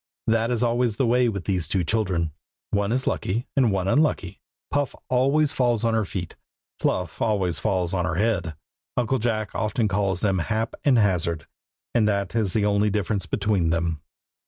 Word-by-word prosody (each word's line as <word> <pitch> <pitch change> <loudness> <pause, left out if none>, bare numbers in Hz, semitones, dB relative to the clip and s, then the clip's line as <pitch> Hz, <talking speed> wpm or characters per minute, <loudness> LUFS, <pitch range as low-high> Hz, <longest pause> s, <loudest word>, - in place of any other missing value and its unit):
That 115 0 +2
is 120 -1 0
always 120 -2 +1
the 130 - +1
way 120 +1 +3
with 100 -5 -4
those 90 -5 0
two 90 +2 0
children. 90 -5 0 0.4
One 100 0 +1
is 130 +2 0
lucky, 115 +7 -1
and 130 -6 +4
one 95 -1 0
unlucky. 140 - +1 0.3
Puff 145 -1 0
always 140 +4 +3
falls 120 -3 +1
on 115 -1 +2
her 110 -2 +1
feet. 90 -2 -5 0.4
Fluff 90 -3 -1
always 95 -7 +1
falls 95 -4 0
on 90 -2 0
her 90 - -1
head. 95 -6 0 0.4
Uncle 125 +2 +1
Jack 110 -2 -1
often 110 +1 0
calls 95 -2 0
them 95 -3 +2
Hap 110 +5 -1
and 135 -4 +4
Hazard, 85 -7 +1 0.5
and 110 -3 +3
that 100 -2 0
is 105 -5 +1
the 105 -2 +2
only 105 0 +2
difference 100 0 -1
between 100 -5 +1
them. 85 -2 -1
105 Hz, 180 wpm, -24 LUFS, 95-115 Hz, 0.5 s, and